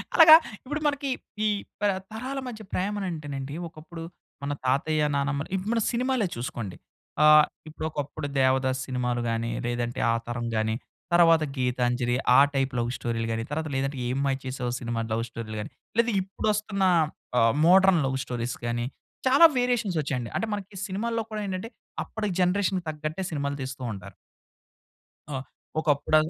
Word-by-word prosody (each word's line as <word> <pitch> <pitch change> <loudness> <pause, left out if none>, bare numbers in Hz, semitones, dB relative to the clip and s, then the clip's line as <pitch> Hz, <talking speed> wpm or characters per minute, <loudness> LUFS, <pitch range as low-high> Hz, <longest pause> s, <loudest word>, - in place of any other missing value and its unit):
అలాగా 320 -2 +11 0.3
ఇప్పుడు 290 +3 -3
మనకి 290 -1 -1 0.4
ఈ - - +4 0.3
ప - - -4 0.3
తరాల 255 +5 -4
మధ్య 225 -3 -7
ప్రేమ 200 +3 0
అంటేనండి 145 -4 -5
ఒకప్పుడు 165 +1 -10 0.4
మన 145 +1 -1
తాతయ్య, 145 +4 +2
నానమ్మలు 140 +1 -1
ఇప్పుడు 190 +4 -2
మన 230 - +1
సినిమాలే 250 -3 +1
చూసుకోండి. 115 -5 -5 0.5
ఆహ్, 150 0 +8 0.2
ఇప్పుడొకప్పుడు 155 -1 -4
దేవదాస్ 130 0 +2
సినిమాలు 125 -2 -1
గాని, 115 0 -1
లేదంటే 120 0 -2
ఆ - - +2
తరం 120 0 -3
గాని 110 0 +1 0.4
తరువాత 165 -2 +6
గీతాంజలి 125 -1 +1 0.2
ఆ - - +9
టైప్ 135 -1 +1
లవ్ 120 0 0
స్టోరీ‌లు 115 -1 -2
గాని, 115 0 -1
తర్వాత 155 +1 -2
లేదంటే 135 +1 -1
ఏ - - -1 0.2
మాయ 135 -1 +2
చేసేవో 130 -1 -3
సినిమా 120 -1 -2
లవ్ 115 +1 0
స్టోరీ‌లు 115 -2 -6
గాని, 105 - -7 0.3
లేదా 235 0 +4
ఇప్పుడొస్తున్న 200 +1 -1 0.6
ఆహ్, 115 -1 +4
మోడర్న్ 190 -1 +6
లవ్ 130 0 0
స్టోరీస్ 120 -1 -3
గాని 120 0 -1 0.4
చాలా 275 +6 +8
వేరియేషన్స్ 245 -7 +1
ఒచ్చాయండి. 125 -5 -3
అంటే - - 0
మనకి 205 -1 -6
సినిమాల్లో 225 +4 -1
కూడా 215 -1 -3
ఏంటంటే 190 +4 -4 0.4
అప్పటి 220 -1 -3
జనరేషన్‌కి 185 0 +1
తగ్గట్టే 155 +4 -4
సినిమాలు 140 -2 -2
తీస్తూ 130 0 -5
ఉంటారు. 95 -3 -10 1.2
ఆ! 145 - -3 0.4
ఒకప్పుడ 145 -1 +2
145 Hz, 150 wpm, -27 LUFS, 125-195 Hz, 1.2 s, అలాగా